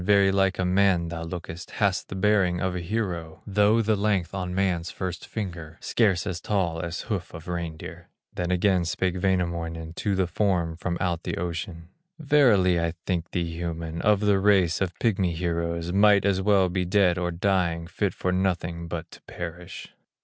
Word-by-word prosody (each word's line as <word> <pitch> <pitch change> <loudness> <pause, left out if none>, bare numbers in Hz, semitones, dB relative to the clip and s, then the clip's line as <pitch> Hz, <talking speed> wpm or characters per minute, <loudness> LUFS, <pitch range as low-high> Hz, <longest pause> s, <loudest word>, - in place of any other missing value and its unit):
Very 100 0 +4
like 95 0 +2
a 95 - 0
man 90 -2 +3
thou 85 0 -5
lookest, 85 0 -7
Hast 100 -4 +1
the - - -5
bearing 95 -3 +2
of 95 -1 -1
a - - -2
hero, 85 -4 -3
Though 105 +3 +3
the 110 0 +2
length 100 -4 0
of 95 -2 -3
man's 90 -2 0
first 90 -3 -5
finger, 85 -6 -6
Scarce 100 -6 +1
as 90 -3 -4
tall 90 -6 0
as 85 +1 -4
hoof 95 -5 -4
of 80 0 -10
reindeer." 85 -1 -6 0.2
Then 90 -1 -2
again 90 0 +2
spake 90 +2 -1
Wainamoinen 85 -3 -1
To 100 -2 0
the 95 -1 +2
form 90 -2 0
from 85 +1 -3
out 85 -3 -1
the - - -4
ocean: 85 0 -5 0.3
"Verily 120 - +4
I 85 -1 -1
think 85 -3 -1
thee 85 -2 -2
human, 85 -1 -4
Of 105 -1 +3
the 100 -2 +3
race 95 -4 +3
of 90 -2 -1
pigmy 95 -6 +1
heroes, 85 0 -2
Might 100 0 +5
as 95 -1 +2
well 95 -1 +4
be 90 +1 -1
dead 90 -1 +3
or 90 -1 -1
dying, 85 -2 0
Fit 95 +3 -2
for 90 - -1
nothing 90 -2 -1
but 85 -1 -6
to - - -14
perish." 85 0 -7
90 Hz, 180 wpm, -26 LUFS, 85-100 Hz, 0.3 s, Might